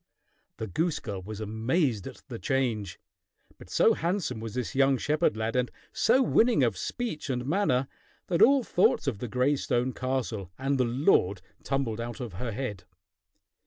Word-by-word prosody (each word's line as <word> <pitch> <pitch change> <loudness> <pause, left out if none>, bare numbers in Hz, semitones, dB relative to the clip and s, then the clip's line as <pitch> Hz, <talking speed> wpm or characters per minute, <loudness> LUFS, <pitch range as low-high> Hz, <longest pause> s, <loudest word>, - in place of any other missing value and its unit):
The 110 - -3
goose 160 - 0
girl 100 -6 -5
was 105 +3 -7
amazed 110 - 0
at - - -10
the 120 -4 -7
change. 120 -8 -1 0.6
But - - -13
so - - +4
handsome 170 - -1
was 110 0 -6
this 125 -3 -3
young 135 0 +4
shepherd 150 -4 +1
lad, 110 +1 -2
and 125 -1 +1 0.2
so 255 +4 +4
winning 230 - +4
of 115 -5 +2
speech 160 - -4
and 125 -1 -1
manner, 140 -5 +1 0.4
that 170 -2 0
all 275 +1 +6
thoughts 180 -6 +2
of 125 -8 -1
the 125 - -4
gray 125 +5 +2
stone 125 -1 0
castle 125 -7 -2
and 135 +1 0
the 125 - +4
lord 120 - +2 0.2
tumbled 130 -5 -1
out 120 +3 -6
of 120 -6 -5
her 115 +6 -4
head. 105 -5 -4
125 Hz, 170 wpm, -28 LUFS, 110-145 Hz, 0.6 s, all